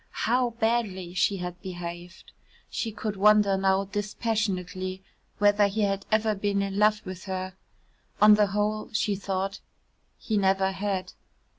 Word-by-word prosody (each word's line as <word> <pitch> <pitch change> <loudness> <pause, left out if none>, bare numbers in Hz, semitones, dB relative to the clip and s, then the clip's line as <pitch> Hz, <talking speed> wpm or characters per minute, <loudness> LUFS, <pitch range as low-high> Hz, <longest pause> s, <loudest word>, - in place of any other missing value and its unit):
How 245 +2 +2
badly 215 -6 0
she 195 +1 +1
had 180 -1 -6
behaved. 175 -1 -8 0.4
She 225 - -2
could 210 0 -4
wonder 205 0 +5
now 190 0 +2
dispassionately 195 -3 -3 0.3
whether 205 0 +4
he 210 +2 -2
had 195 -1 -1
ever 215 0 +2
been 200 0 0
in 195 0 -3
love 210 0 +3
with 185 -1 -7
her. 185 -1 -4 0.7
On 210 0 +8
the 210 0 +4
whole, 210 +2 -1
she 210 -1 +1
thought, 195 0 -3 0.6
he 220 - -2
never 190 -1 +2
had. 190 -1 -3
200 Hz, 140 wpm, -27 LUFS, 190-210 Hz, 0.7 s, On